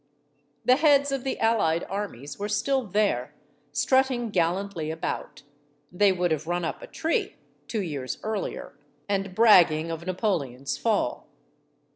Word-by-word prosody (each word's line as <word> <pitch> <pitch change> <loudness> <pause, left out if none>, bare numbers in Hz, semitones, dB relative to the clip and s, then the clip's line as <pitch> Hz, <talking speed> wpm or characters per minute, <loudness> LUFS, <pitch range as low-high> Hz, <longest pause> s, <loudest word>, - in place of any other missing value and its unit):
The 255 +1 +5
heads 285 -2 +4
of 270 -2 -2
the 265 - -3
allied 205 -8 +2
armies 160 - -5
were 205 +1 -3
still 265 +6 +1
there, 175 - 0 0.4
strutting 255 - +1
gallantly 175 -2 -1
about 160 -2 -5 0.5
they 195 +2 +4
would 180 -2 0
have 155 0 -1
run 175 0 -1
up - - -4
a - - -9
tree, 325 +1 -1 0.3
two 220 -4 -2
years 140 -7 -4
earlier 215 -2 -4 0.3
and 195 -2 -2
bragging 170 -8 +5
of 165 +2 -6
Napoleon's 160 - -1
fall. 210 - -1
195 Hz, 135 wpm, -26 LUFS, 160-225 Hz, 0.5 s, The